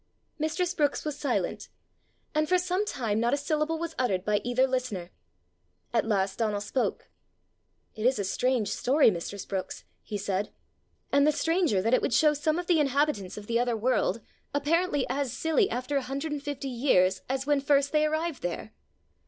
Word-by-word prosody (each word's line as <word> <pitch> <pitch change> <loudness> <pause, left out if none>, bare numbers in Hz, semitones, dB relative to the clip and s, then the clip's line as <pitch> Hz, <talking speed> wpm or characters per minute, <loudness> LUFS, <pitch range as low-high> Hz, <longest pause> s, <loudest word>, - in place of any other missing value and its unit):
Mistress 335 +4 0
Brookes 295 -4 0
was 300 -2 -2
silent, 295 -1 -2 0.6
and 305 0 +1
for 365 - +5
some 365 +3 -1
time 225 - -1
not 235 +3 +2
a - - -3
syllable 305 +2 -1
was 335 0 -4
uttered 195 -7 0
by 210 -1 +1
either 245 +2 +2
listener. 250 -9 -3 0.8
At 230 -1 +1
last 195 -2 0
Donal 215 -3 0
spoke. 210 +5 -2 0.8
"It 220 +1 0
is 260 - +2
a 200 - -1
strange 245 +3 0
story, 275 -1 +3
mistress 185 +2 -5
Brookes," 190 -1 -5 0.2
he 210 - -5
said; 200 0 -2 0.6
"and 280 +1 +4
the - - +5
stranger 310 - +1
that 230 +3 +1
it - - +4
would 235 - +1
show 300 +4 +5
some 305 +2 0
of 355 - -3
the 345 -2 +3
inhabitants 275 -9 0
of 210 - -7
the 235 +2 +1
other 240 -1 +1
world 235 0 +1 0.3
apparently 295 0 +1
as 275 -3 -1
silly 320 - +2
after 255 +4 -2
a - - +1
hundred 275 +4 -4
and 295 -1 -3
fifty 285 -1 -4
years 230 -8 +2
as 265 +1 -1
when 290 -1 +2
first 280 0 +2
they 305 0 +3
arrived 315 0 -2
there." 175 +5 -4
270 Hz, 185 wpm, -28 LUFS, 220-305 Hz, 0.8 s, for